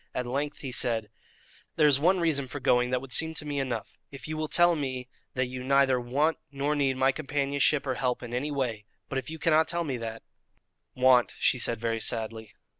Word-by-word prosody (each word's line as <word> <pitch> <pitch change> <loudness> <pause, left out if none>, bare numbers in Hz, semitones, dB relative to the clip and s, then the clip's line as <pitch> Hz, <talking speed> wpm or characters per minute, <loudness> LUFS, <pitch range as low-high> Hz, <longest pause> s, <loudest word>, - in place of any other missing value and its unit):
At 125 - -2
length 140 +4 -3
he 135 - -5
said: 115 -4 -1 0.6
"There 155 - +4
is 140 -2 +5
one 180 +5 +3
reason 150 -5 +1
for 145 +3 -6
going 125 -1 +2
that 125 0 0
would 135 -1 -1
seem 160 0 +4
to 150 - -4
me 145 -1 -2
enough: 120 -5 -4
if 135 +1 -8
you 155 - -4
will 155 0 -2
tell 175 +2 +4
me 130 -4 -4 0.3
that 130 0 +1
you 125 0 -6
neither 135 -1 +3
want 145 +7 0
nor 145 +2 -1
need 135 -3 +1
my 135 +1 +3
companionship 140 0 0
or 130 - -1
help 125 -1 -2
in 120 0 -7
any 130 +5 -2
way; 125 -7 -3 0.2
but 135 - -1
if 135 - -8
you 160 - -6
cannot 160 0 +3
tell 170 +1 -2
me 135 -6 -3
that 115 -1 -6 0.4
" - - -53
"Want," 125 -2 +5
she 125 - +2
said 115 -1 0
very 115 0 -1
sadly. 110 -1 -3
135 Hz, 220 wpm, -28 LUFS, 125-150 Hz, 0.6 s, is